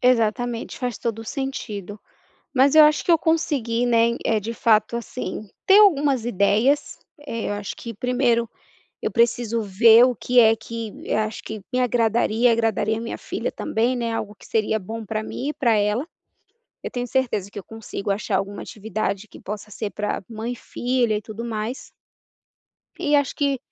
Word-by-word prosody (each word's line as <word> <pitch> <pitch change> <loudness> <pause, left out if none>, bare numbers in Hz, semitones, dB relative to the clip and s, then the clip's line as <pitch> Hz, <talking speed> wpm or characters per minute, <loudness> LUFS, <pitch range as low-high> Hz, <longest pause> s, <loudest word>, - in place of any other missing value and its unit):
Exatamente, 240 -1 +1
faz 245 -4 -3
todo 225 -2 -3
o - - -8
sentido, 215 -6 -5 0.5
mas 275 +2 +4
eu 310 -1 +9
acho 300 0 +3
que - - 0
eu 335 - +6
consegui, 265 -8 0
né, 235 0 +3
eh, 220 - +2
de 220 +3 -4
fato 220 0 +2
assim, 235 -2 -5 0.2
ter 390 +1 +7
algumas 290 - +4
ideias, 235 +6 +2 0.3
eu 230 -5 -3
acho 205 -1 -5
que 230 -1 -7
1º 245 0 +1 0.5
eu - - -1
preciso 235 -1 +1
ver 220 +4 +6
o 250 -1 +1
que 250 +4 +3
é 225 -1 +5
que 225 -1 -6
eu - - 0
acho 215 0 -2
que 220 -1 -6
me 250 - +1
agradaria, 235 -1 +2
agradaria 225 -1 +1
a - - -5
minha 230 - -5
filha - - -4
também, 235 +3 0
né, 235 -1 -2
algo 210 -2 -4
seria 220 0 0
bom 220 +3 -7
para 215 +1 -3
mim 255 +5 -5
e - - -2
para 235 -5 +2
ela, 210 +7 +1 0.8
eu - - -5
tenho 245 -1 -3
certeza 240 -6 -1
que 205 - -8
eu 195 - -8
consigo 220 -2 -6
achar 200 0 0
alguma 200 +1 -3
atividade 215 -1 -4
que - - -14
possa 210 +1 -7
ser 210 0 -4
para 210 0 -3
mãe 225 +1 -4
e - - -6
filha 240 -2 0
e 210 - -4
tudo 215 +2 -7
mais. 225 +2 -5 1.1
E 295 - +1
acho 285 -2 +1
que 280 -2 0
230 Hz, 180 wpm, -23 LUFS, 215-250 Hz, 1.1 s, eu